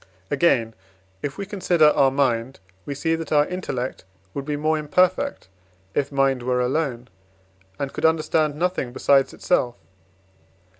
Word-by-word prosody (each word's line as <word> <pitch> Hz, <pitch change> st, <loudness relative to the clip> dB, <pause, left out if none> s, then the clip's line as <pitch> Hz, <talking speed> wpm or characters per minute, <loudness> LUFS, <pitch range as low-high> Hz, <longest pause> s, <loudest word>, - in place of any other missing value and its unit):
Again, 130 Hz, -7 st, +2 dB, 0.5 s
if 140 Hz, -1 st, -4 dB
we 200 Hz, -, -4 dB
consider 180 Hz, -6 st, +3 dB
our 135 Hz, -2 st, +4 dB
mind, 130 Hz, -2 st, 0 dB, 0.3 s
we 140 Hz, -, -3 dB
see 160 Hz, +4 st, 0 dB
that 165 Hz, -2 st, -4 dB
our 145 Hz, -1 st, +4 dB
intellect 130 Hz, -, -4 dB, 0.3 s
would 140 Hz, -, -4 dB
be 150 Hz, 0 st, -2 dB
more 155 Hz, +2 st, +1 dB
imperfect, 185 Hz, -, +1 dB, 0.5 s
if 140 Hz, -, -1 dB
mind 135 Hz, -2 st, +2 dB
were 125 Hz, 0 st, 0 dB
alone, 125 Hz, -1 st, -1 dB, 0.7 s
and 140 Hz, -1 st, -4 dB
could -, -, -2 dB
understand 155 Hz, -1 st, +2 dB
nothing 170 Hz, -7 st, -1 dB
besides 135 Hz, +1 st, +3 dB
itself. 120 Hz, -9 st, 0 dB
145 Hz, 140 wpm, -23 LUFS, 130-160 Hz, 0.7 s, our